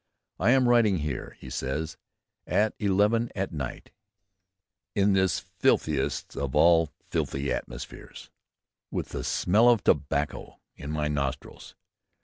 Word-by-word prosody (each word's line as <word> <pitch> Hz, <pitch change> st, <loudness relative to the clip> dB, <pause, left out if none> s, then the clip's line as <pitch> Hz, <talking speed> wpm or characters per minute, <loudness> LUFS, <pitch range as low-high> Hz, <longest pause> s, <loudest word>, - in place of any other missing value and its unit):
"I 100 Hz, -, +3 dB
am 130 Hz, 0 st, +5 dB
writing 115 Hz, -5 st, +4 dB
here," 75 Hz, -5 st, -5 dB
he -, -, -10 dB
says, 75 Hz, +4 st, -3 dB, 0.5 s
"at 105 Hz, +1 st, +2 dB
eleven 105 Hz, +3 st, +2 dB
at 95 Hz, 0 st, -2 dB
night, 70 Hz, -5 st, -6 dB, 1.0 s
in 100 Hz, 0 st, +3 dB
this 95 Hz, -2 st, +2 dB
filthiest 75 Hz, -4 st, 0 dB
of 70 Hz, -1 st, -3 dB
all 80 Hz, 0 st, +5 dB, 0.2 s
filthy 70 Hz, 0 st, -1 dB
atmospheres... -, -, -8 dB, 0.6 s
with -, -, -4 dB
the -, -, -5 dB
smell 110 Hz, +7 st, +3 dB
of 115 Hz, -6 st, +3 dB
tobacco 70 Hz, +1 st, 0 dB, 0.2 s
in 70 Hz, -, -8 dB
my 75 Hz, 0 st, -1 dB
nostrils.... 70 Hz, -2 st, -4 dB
80 Hz, 125 wpm, -27 LUFS, 70-105 Hz, 1.0 s, am